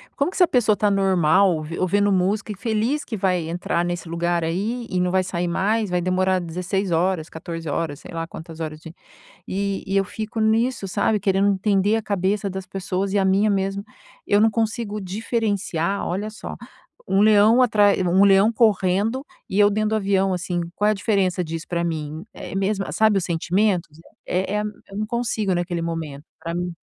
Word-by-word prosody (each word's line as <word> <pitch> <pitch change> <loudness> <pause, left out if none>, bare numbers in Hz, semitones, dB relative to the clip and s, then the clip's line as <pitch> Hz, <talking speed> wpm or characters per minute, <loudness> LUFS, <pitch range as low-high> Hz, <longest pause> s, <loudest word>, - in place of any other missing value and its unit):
Como 280 - +1
que - - -12
essa 360 - +5
pessoa 245 -9 +3
está 210 0 +1
normal, 190 -2 +3
ou 155 -1 -5
ouvindo 205 +3 +2
música 195 +3 0
e - - -5
feliz 230 +7 -1
que 220 - -5
vai 180 -4 0
entrar 170 0 -1
nesse 175 -1 -4
lugar 170 0 0
aí 205 +9 -2
e 185 - -1
não 180 0 +1
vai 190 0 +2
sair 175 -1 -2
mais? 210 +5 0
Vai 180 0 0
demorar 185 +1 +1
16 180 +3 -3
horas, 170 -1 0
14 165 -1 -6
horas. 145 -1 -2
Sei - - -11
lá 165 0 -3
quantas 165 0 -10
horas 155 -1 -5
de“, 160 - -10 0.6
e 200 0 -2
e 195 0 -1
eu 195 - +3
fico 220 +2 -5
nisso, 220 0 +1
sabe, 210 +3 +1
querendo 195 +1 +2
entender 200 +1 +2
a 225 - -2
cabeça 200 0 -1
das 190 0 -6
pessoas 190 0 -3
e 205 - +2
a 195 - +2
minha 195 +3 +3
mesmo. 195 0 -1 0.4
Eu 205 - +3
não 220 +1 +5
consigo 220 -1 -2
diferenciar 200 -3 -2
olha 200 +4 -3
só, 215 - -8 0.5
um 195 +1 +3
leão 215 +3 +6
atra 210 -4 +4 0.2
um 190 +3 +5
leão 200 +3 +5
correndo 215 +3 +2 0.2
e 190 - -2
eu 205 0 +6
dentro 215 +1 0
do 220 - +1
avião 195 -2 +1
assim, 175 0 -2 0.2
qual 210 - +2
é - - +5
a - - 0
diferença 195 -3 0
disso 165 0 -6
para 170 -1 -1
mim? 155 -1 -4
É - - -8
mesmo, 195 +1 0
sabe, 215 -2 +3
os 185 - -2
sentimentos 175 -1 0 0.3
é 190 +2 -1
é - - +1 0.3
eu 195 - -10
não 215 - -1
consigo 220 -4 -1
naquele 175 -1 -2
momento 160 -4 -5
pra 165 +1 -5
mim 175 0 -2
195 Hz, 195 wpm, -22 LUFS, 175-210 Hz, 0.6 s, leão